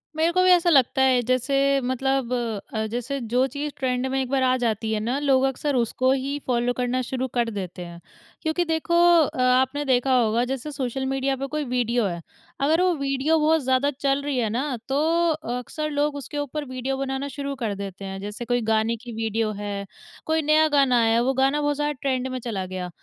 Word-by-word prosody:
मेरे 320 +2 +2
को 365 - +3
भी 370 - +4
ऐसा 350 -1 +5
लगता 270 -4 +4
है 260 -2 +4
जैसे 275 +3 +2
मतलब 260 0 -1 0.4
अ, 220 0 -1
जैसे 245 +4 -3
जो 245 +3 +1
चीज़ 285 +3 -4
ट्रेंड 255 -1 -1
में 265 0 0
एक 260 - -4
बार 270 -1 +1
आ 255 0 +3
जाती 220 -2 -1
है 215 - 0
ना 235 +5 -1
लोग 270 -2 +3
अक्सर 270 +2 -1
उसको 255 +2 +1
ही 275 +2 -1
फॉलो 245 -1 +1
करना 250 +1 -1
शुरू 260 +1 -3
कर 240 -2 +1
देते 185 -4 -6
हैं। 170 0 -10 0.4
क्योंकि 325 +2 0
देखो 325 +1 -1 0.3
अ, 270 -4 -1
आपने 260 +3 +2
देखा 260 0 +2
होगा 230 0 +2
जैसे 270 +3 -4
सोशल 265 -1 -3
मीडिया 270 0 0
पे 270 +1 -4
कोई 305 +2 -3
वीडियो 245 -2 0
है, 170 -3 -3 0.4
अगर 315 +5 +3
वो 365 -1 +3
वीडियो 275 +2 +1
बहुत 315 +1 +3
ज़्यादा 260 +2 +2
चल 275 0 +1
रही 285 -2 -2
है 230 -3 +1
ना 255 +4 -2
तो 270 - +1 0.6
अक्सर 305 +5 -4
लोग 290 0 0
उसके 285 +1 -6
ऊपर 290 +1 -3
वीडियो 255 +1 -3
बनाना 270 +1 -3
शुरू 280 0 -5
कर 225 -6 -3
देते 195 -1 -7
हैं। 195 0 -6
जैसे 210 +4 -6
कोई 245 0 0
गाने 220 +1 +2
की 240 +1 -10
वीडियो 225 0 -1
है, 200 -1 -4 0.4
कोई 320 0 +1
नया 310 +1 +4
गाना 275 -4 +3
आया 225 0 +3
है 230 - +3
वो 265 +2 +1
गाना 270 +3 +2
बहुत 290 0 +1
ज़्यादा 295 +1 -1
ट्रेंड 260 -2 -1
में 255 0 -4
चला 220 -6 -4
गया 185 -1 -5
260 Hz, 215 wpm, -24 LUFS, 240-280 Hz, 0.6 s, ऐसा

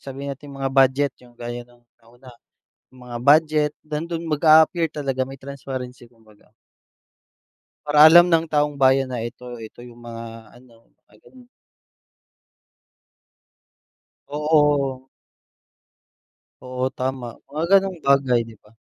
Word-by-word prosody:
sabihin 140 +1 -7
nating 140 +1 -13
mga 135 -1 -3
budget 135 +1 +3
yung 120 -1 -19
gaya 120 0 -6
ng 120 0 -25 0.2
nauna, 120 +3 -18 0.6
mga 125 -2 -10
budget 150 0 +3
nandun 165 +2 -5
mag-appear 160 +2 +4
talaga 135 -3 -3
may 135 0 -10
transparency 130 -2 -8
kumbaga. 110 -3 -25 1.3
Para 150 +1 +6
alam 175 +2 +8
ng 165 -1 +2
taong 150 -2 -1
bayan 135 0 +3
na 120 -3 -4
ito 125 +1 -9
ito 110 +1 -12
yung 120 -1 -14
mga 115 -1 -10
ano, 120 -1 -21 0.2
mga - - -25
ganun. 250 -2 -18 2.8
Oo. 145 -3 +1 1.6
Oo 125 0 -3
tama, 130 -1 -3 0.2
mga 150 +3 -3
ganong 195 -2 +3
bagay, 135 -3 +3
di - - -12
ba? 105 - -23
135 Hz, 120 wpm, -22 LUFS, 120-150 Hz, 2.8 s, alam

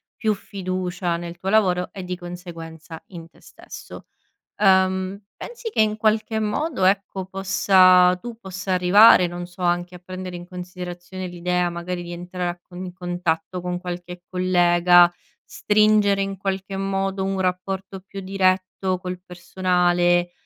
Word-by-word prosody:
più 215 -2 0
fiducia 185 -3 -3
nel 170 0 -7
tuo 190 +2 -4
lavoro 185 -4 +2
e 190 -2 -7
di 180 - -3
conseguenza 165 -2 -9
in 170 -3 -10
te - - -24
stesso. - - -12 0.5
Ehm, 190 0 +2 0.2
pensi 480 -1 -7
che, 220 - +1
in 215 0 +2
qualche 220 0 +1
modo, 220 - -1
ecco, 195 -1 0
possa 185 -1 +4
tu 240 -2 -8
possa 190 -2 -4
arrivare, 180 +1 +7
non 175 0 -6
so, 175 +1 -14
anche 175 0 0
a 180 - -11
prendere 185 0 -7
in 175 0 -9
considerazione 180 0 -7
l'idea 180 0 -1
magari 175 +1 -5
di 175 - -8
entrare 180 +1 -4
a 175 - -6
con 180 +1 -10
in 180 - -6
contatto 175 -1 -3
con 180 0 -3
qualche 180 0 -7
collega, 175 -1 +4 0.3
stringere, 210 -1 +3
in 195 -1 -5
qualche 195 0 -3
modo, 195 0 -2
un 195 0 -2
rapporto 190 +1 -3
più 195 +1 -9
diretto 185 -1 0
col 180 -1 -6
personale, 175 -1 +1
185 Hz, 145 wpm, -22 LUFS, 175-195 Hz, 0.5 s, arrivare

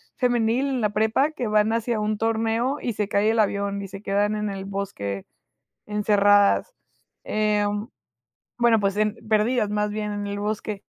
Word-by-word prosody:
femenil, 245 +1 +1
en 260 -3 -1
la 210 - +1
prepa, 220 +8 +2
que 250 -6 -4
van 215 +1 +2
hacia 230 -1 -1
un 210 0 -1
torneo 225 +4 0
y 240 - -2
se 210 -1 -2
cae 210 +2 +2
el 225 - 0
avión 200 -1 0
y 195 - -6
se 195 0 -9
quedan 205 +1 0
en 210 -1 -2
el 195 -1 -5
bosque 190 - -4 0.6
encerradas. 205 - +3 0.5
Em, 210 0 0 0.7
bueno 235 -2 +4
pues, 200 0 0
em, 215 0 +1
perdidas 220 0 +2
más 210 0 0
bien 210 0 -3
en 205 0 -4
el 200 0 -4
bosque. 210 -1 -3
210 Hz, 170 wpm, -24 LUFS, 205-225 Hz, 0.7 s, bueno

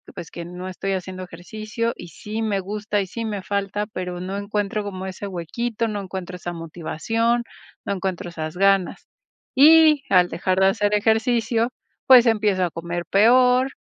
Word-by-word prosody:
pues, 165 - -8
que 170 - -7
no 180 +2 -7
estoy 195 +1 -3
haciendo 185 0 -5
ejercicio 215 +6 -4
y 175 - -9
sí 210 +7 -6
me 205 -3 0
gusta 210 +1 -2
y 195 - -4
sí 230 +5 -5
me 210 -3 -3
falta, 200 +1 -2
pero 180 -3 -5
no 190 +2 -4
encuentro 205 0 -2
como 190 -2 -6
ese 190 +2 -6
huequito, 225 +6 -3
no 210 -1 -3
encuentro 185 -1 -6
esa 175 0 -6
motivación, 200 +8 -1 0.4
no - - -3
encuentro 185 -2 -3
esas 155 -1 -6
ganas. 195 -1 +2 0.5
Y 305 +1 +7
al 180 -2 +4
dejar 185 +1 -1
de 190 - +6
hacer 205 +1 +1
ejercicio, 225 +2 +1 0.4
pues, 255 -2 +8
empiezo 210 -5 +2
a 175 - +1
comer 170 +1 -4
peor, 250 +5 +4
200 Hz, 170 wpm, -22 LUFS, 180-225 Hz, 0.5 s, pues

